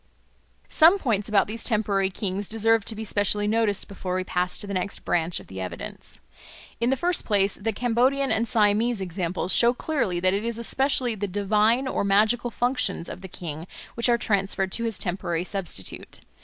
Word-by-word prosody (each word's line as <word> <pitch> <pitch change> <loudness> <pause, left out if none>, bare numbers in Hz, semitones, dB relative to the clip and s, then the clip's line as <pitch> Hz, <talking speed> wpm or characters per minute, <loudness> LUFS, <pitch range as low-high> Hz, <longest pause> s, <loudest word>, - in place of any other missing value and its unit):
Some 335 +5 +6
points 220 - -1
about 200 -2 +4
these 225 +2 -5
temporary 200 -4 +1
kings 195 0 -3
deserve 225 0 +2
to 220 - -1
be 220 - -5
specially 205 0 0
noticed 215 -2 0
before 185 -2 -5
we 185 - -1
pass 180 0 -1
to - - -5
the 200 - -5
next 185 +1 -3
branch 170 0 +1
of - - -13
the 95 0 -8
evidence. 90 - -7 0.6
In 235 +1 +1
the 265 - +1
first 350 +2 +1
place, 200 -2 +2
the 225 +2 -2
Cambodian 250 +5 +1
and 230 +1 +1
Siamese 220 +1 +2
examples 180 0 -2
show 240 +1 +4
clearly 245 - -1
that 185 +1 +2
it 200 +2 -1
is 230 -1 -2
especially 255 +1 +1
the 205 -1 -3
divine 210 +6 +2
or 260 - -1
magical 215 +5 +2
functions 245 -6 0
of 180 - -8
the 190 - -8
king 165 -2 -7 0.3
which 235 +1 0
are 235 - +4
transferred 195 -3 0
to 230 - -1
his 225 -3 -2
temporary 175 -2 -2
substitute. 180 - -4
210 Hz, 185 wpm, -25 LUFS, 190-235 Hz, 0.6 s, Some